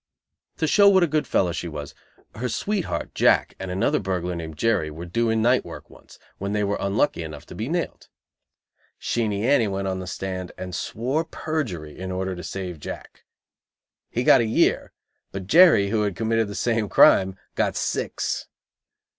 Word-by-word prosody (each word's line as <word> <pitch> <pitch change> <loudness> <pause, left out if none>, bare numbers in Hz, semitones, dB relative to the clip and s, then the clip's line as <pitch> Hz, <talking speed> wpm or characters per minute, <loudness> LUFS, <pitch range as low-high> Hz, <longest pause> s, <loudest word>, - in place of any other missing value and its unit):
To 160 - 0
show 200 +6 +6
what 190 -2 +5
a - - +3
good 150 -3 0
fellow 90 -4 +2
she 85 +1 -4
was, 75 -3 -7 0.4
her 125 +3 -3
sweetheart, 190 - -2
Jack, - - +3
and 95 - -5
another 90 +1 +1
burglar 90 -2 -2
named 80 -2 -7
Jerry 100 -6 +1
were 80 +3 -8
doing 110 +4 0
night 125 +2 +3
work - - -10
once, - - -17 0.2
when 100 +1 -3
they 105 0 +1
were 100 0 -1
unlucky 100 +3 0
enough 75 -3 -8
to - - -11
be 110 +5 -4
nailed. 175 +1 -3 0.9
Sheenie 110 -3 -1
Annie 125 -4 +4
went 100 0 -2
on 95 -1 -2
the 90 - -7
stand 95 -1 -5
and 90 -1 -6
swore 130 - -2
perjury 125 - -4
in 95 0 -5
order 95 0 -2
to 90 - -8
save 90 -4 -5
Jack. - - -9 0.8
He 120 - -1
got - - +6
a - - +1
year, 110 - +1 0.4
but 95 -1 -6
Jerry, 155 - +6
who 110 -1 +1
had 100 -3 -1
committed 115 0 0
the 100 - -7
same 115 -4 0
crime, 95 +1 +5 0.2
got - - 0
six. - - -2
100 Hz, 180 wpm, -24 LUFS, 90-120 Hz, 0.9 s, show